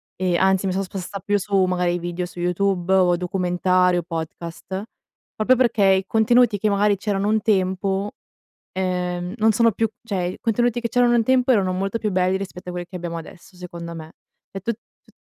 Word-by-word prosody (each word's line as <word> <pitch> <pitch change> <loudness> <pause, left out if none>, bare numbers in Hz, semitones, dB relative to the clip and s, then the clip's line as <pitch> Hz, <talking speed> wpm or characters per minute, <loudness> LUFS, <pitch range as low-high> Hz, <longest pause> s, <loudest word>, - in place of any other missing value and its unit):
e 180 -2 0
anzi 190 0 +2
mi 190 - 0
sono 195 +1 -1
sposta 195 +1 -6
più 205 +2 0
su, 195 0 +1
magari, 180 -1 0
video 175 +1 -3
su 175 - -11
YouTube 180 +1 0
o, 180 -2 +4
documentari, 180 0 +1
o 175 - -1
podcast; 170 +3 -6 0.5
proprio 230 +4 +3
perché, 235 -4 +2
i 190 0 +3
contenuti, 225 +1 +3
che 215 +2 0
magari 205 0 +2
c'erano 200 0 -1
un 220 0 +2
tempo, 195 0 0 0.6
ehm, 180 -1 -2
non 220 +1 +4
sono 230 +2 +3
più 225 +2 0
cioè 200 -6 -2
i 180 - -5
contenuti 240 +1 +1
che 235 - -2
c'erano 245 0 +3
un 235 - +3
tempo, 260 +2 +3
erano 195 -6 +2
molto 195 +4 -2
più 210 -2 -1
belli 185 0 +1
rispetto 180 -2 -7
a - - -4
quelli 175 0 -5
che - - -11
abbiamo 170 -1 -5
adesso 170 +3 -12
secondo 170 -1 -8
me. 160 0 -9 0.4
E' 195 - -6
tut 230 +4 -2 0.3
tu - - -24
190 Hz, 195 wpm, -22 LUFS, 180-210 Hz, 0.6 s, o